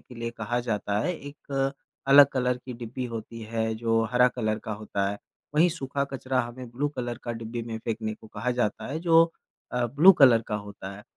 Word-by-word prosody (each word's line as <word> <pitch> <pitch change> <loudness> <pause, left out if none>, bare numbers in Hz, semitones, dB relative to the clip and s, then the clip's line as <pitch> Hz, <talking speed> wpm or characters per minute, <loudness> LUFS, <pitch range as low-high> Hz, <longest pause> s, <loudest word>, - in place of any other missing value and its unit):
के 125 - -15
लिए 115 0 -4
कहा 120 +1 -2
जाता 105 -3 -1
है, 180 - 0
एक 140 -2 -3 0.4
अलग 140 +1 +9
कलर 125 -1 +1
की 130 - -6
डिब्बी 120 +2 -6
होती 115 0 -7
है, 110 0 -2
जो 115 0 +1
हरा 125 0 +5
कलर 110 -3 -2
का 110 - -3
होता 100 -2 -2
है। 100 - -5 0.4
वहीं 165 +4 +5
सूखा 140 -4 -2
कचरा 130 -1 0
हमें 120 +1 -7
ब्लू 135 +5 -1
कलर 120 -2 -3
का 120 - -3
डिब्बी 115 +1 -5
में 115 -1 -5
फ़ेंकने 110 -1 -3
को 110 - -16
कहा 125 +3 -3
जाता 120 -4 -1
है 155 - -2
जो, 165 -1 +6 0.5
अ, 125 -1 +1
ब्लू 150 +11 +7
कलर 120 -5 +7
का - - -2
होता 100 -2 -6
है। 105 - -12
120 Hz, 210 wpm, -27 LUFS, 110-130 Hz, 0.5 s, अलग